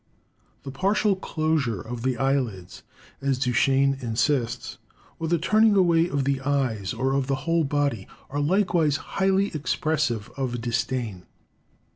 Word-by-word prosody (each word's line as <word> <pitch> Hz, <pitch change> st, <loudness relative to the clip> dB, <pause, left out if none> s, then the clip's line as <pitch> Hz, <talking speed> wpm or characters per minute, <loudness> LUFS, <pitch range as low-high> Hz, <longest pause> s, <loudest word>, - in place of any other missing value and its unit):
The 135 Hz, -, -6 dB
partial 195 Hz, +7 st, +1 dB
closure 155 Hz, -, -1 dB
of 115 Hz, +4 st, -6 dB
the 130 Hz, 0 st, -1 dB
eyelids, 125 Hz, -9 st, -2 dB, 0.4 s
as 135 Hz, -1 st, 0 dB
Duchenne 135 Hz, +2 st, +2 dB
insists, 120 Hz, +1 st, -1 dB, 0.4 s
or 165 Hz, -, -2 dB
the 170 Hz, +1 st, +2 dB
turning 215 Hz, +5 st, +3 dB
away 170 Hz, -3 st, +4 dB
of 140 Hz, -3 st, 0 dB
the 135 Hz, 0 st, 0 dB
eyes 130 Hz, -8 st, -1 dB
or 135 Hz, +1 st, -1 dB
of 135 Hz, -1 st, 0 dB
the 135 Hz, -, +1 dB
whole 165 Hz, 0 st, +2 dB
body, 140 Hz, -8 st, -1 dB, 0.2 s
are 145 Hz, -, -2 dB
likewise 165 Hz, -3 st, +2 dB
highly 195 Hz, +4 st, 0 dB
expressive 145 Hz, -6 st, -1 dB
of 125 Hz, -3 st, -2 dB
disdain. 115 Hz, -4 st, -3 dB
140 Hz, 135 wpm, -25 LUFS, 125-160 Hz, 0.4 s, away